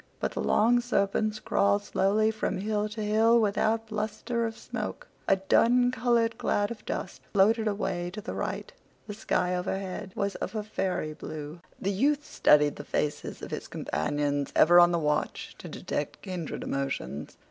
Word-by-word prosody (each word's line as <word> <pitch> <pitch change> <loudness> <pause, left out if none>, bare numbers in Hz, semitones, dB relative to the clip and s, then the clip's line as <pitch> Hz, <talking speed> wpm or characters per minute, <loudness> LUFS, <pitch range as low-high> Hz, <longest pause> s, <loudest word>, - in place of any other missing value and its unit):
But - - -1
the - - -3
long 240 +3 +4
serpents 215 -2 0
crawled 200 0 +2
slowly 215 +3 +2
from 215 -3 -2
hill 210 +2 -1
to 215 0 -5
hill 220 +3 +4
without 220 +1 +1
bluster 225 +2 -2
of 225 - -7
smoke. - - -5 0.2
A 195 - +5
dun 245 +6 +3
colored 235 -2 +1
cloud 205 +1 +1
of 235 - -8
dust - - -4
floated 220 +3 +4
away 185 -4 -1
to 210 - -5
the - - -6
right. - - -4 0.3
The 210 - -6
sky 180 -3 0
overhead 190 +1 -4
was 200 0 -1
of - - -5
a 215 - -1
fairy 190 -7 -2
blue. 155 +1 -7 0.2
The 195 - -1
youth 285 +9 +1
studied 150 -1 +4
the - - -6
faces 150 0 -3
of - - -7
his - - -5
companions, 145 - -1
ever 175 +2 +7
on 175 0 +7
the 170 - +2
watch 150 -2 -1
to - - -8
detect - - -4
kindred 180 -5 -5
emotions. 135 - -4
205 Hz, 170 wpm, -28 LUFS, 175-220 Hz, 0.3 s, ever